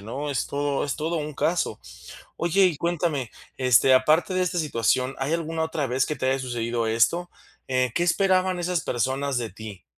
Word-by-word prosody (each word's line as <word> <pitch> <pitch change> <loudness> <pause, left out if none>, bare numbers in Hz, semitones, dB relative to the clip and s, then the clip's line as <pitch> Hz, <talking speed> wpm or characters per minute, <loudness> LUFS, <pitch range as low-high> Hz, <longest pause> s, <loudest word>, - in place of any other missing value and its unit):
¿no? 135 +8 -5
Es 135 - -1
todo 145 0 -1
es 140 - -2
todo 160 +3 -2
un 150 -2 -4
caso. 170 +4 -1 0.6
Oye, 185 +3 +3
y 165 -5 +1
cuéntame, 165 -7 -1 0.3
este, 130 0 +5
aparte 155 +8 +3
de 185 - +2
esta 180 -1 -1
situación, 130 -2 0
¿hay 135 +4 -1
alguna 165 -1 -2
otra 160 -3 -2
vez 130 +2 +1
que 150 - -3
te 130 - -1
haya 135 0 +1
sucedido 120 -2 -2
esto? 145 +11 +1 0.4
Eh, 130 -2 +1
¿qué 175 - +2
esperaban 185 0 +2
esas 175 -1 -1
personas 130 +2 -1
de 115 -2 -2
ti? 100 -1 -10
140 Hz, 185 wpm, -25 LUFS, 125-170 Hz, 0.6 s, este